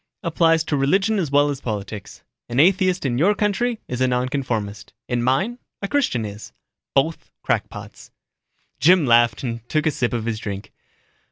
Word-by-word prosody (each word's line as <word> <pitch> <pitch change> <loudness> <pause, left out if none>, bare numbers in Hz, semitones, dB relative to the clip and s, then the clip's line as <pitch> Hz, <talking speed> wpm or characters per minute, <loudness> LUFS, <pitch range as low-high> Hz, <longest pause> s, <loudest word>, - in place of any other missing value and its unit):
Applies 165 -1 +3
to 155 - -1
religion 195 +10 +2
as 165 -6 -1
well 145 +1 +3
as 140 - -6
politics. 105 -2 -6 0.3
An 120 +2 0
atheist 185 +1 +3
in 120 -2 0
your 200 +7 +4
country 215 +3 0
is 125 0 -4
a 130 - +4
nonconformist 125 -6 -2
in 120 -1 -1
mine, 135 - 0 0.2
a - - 0
Christian 195 - 0
is. 105 +1 -9 0.4
Both 155 +4 0
crackpots." - - -4 0.7
Jim 175 0 +5
laughed 120 -2 +4
and 115 -2 -3
took 155 0 0
a 155 - +3
sip 125 -4 -1
of 115 -2 -2
his 115 -2 -2
drink. 100 -2 -6
135 Hz, 165 wpm, -22 LUFS, 120-175 Hz, 0.7 s, Jim